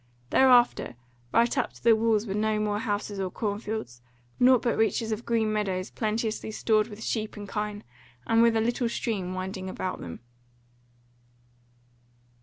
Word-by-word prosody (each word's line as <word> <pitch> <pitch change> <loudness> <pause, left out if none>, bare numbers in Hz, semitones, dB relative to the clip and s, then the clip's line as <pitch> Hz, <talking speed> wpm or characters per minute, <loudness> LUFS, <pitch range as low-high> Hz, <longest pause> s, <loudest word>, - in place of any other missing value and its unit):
Thereafter 245 - +4 0.4
right 235 +1 +3
up - - -2
to - - -18
the 230 -1 +6
walls 220 -1 +2
were 195 - -3
no 215 +1 +1
more 210 -1 0
houses 205 -2 -3
or 190 -1 -1
cornfields, 205 - -4 0.4
nought 250 -1 +5
but 235 - +1
reaches 225 0 +1
of 215 +2 -4
green 225 -2 +1
meadows 190 -3 -2
plenteously 220 0 -2
stored 215 -1 +2
with 215 0 -9
sheep 215 -2 -2
and 205 -1 -7
kine, 210 0 -4 0.4
and 225 0 +3
with 230 -1 +4
a - - +2
little 240 +1 0
stream 190 -6 -3
winding 190 0 -4
about 185 0 -4
them. 85 +4 -8
215 Hz, 155 wpm, -27 LUFS, 205-230 Hz, 0.4 s, the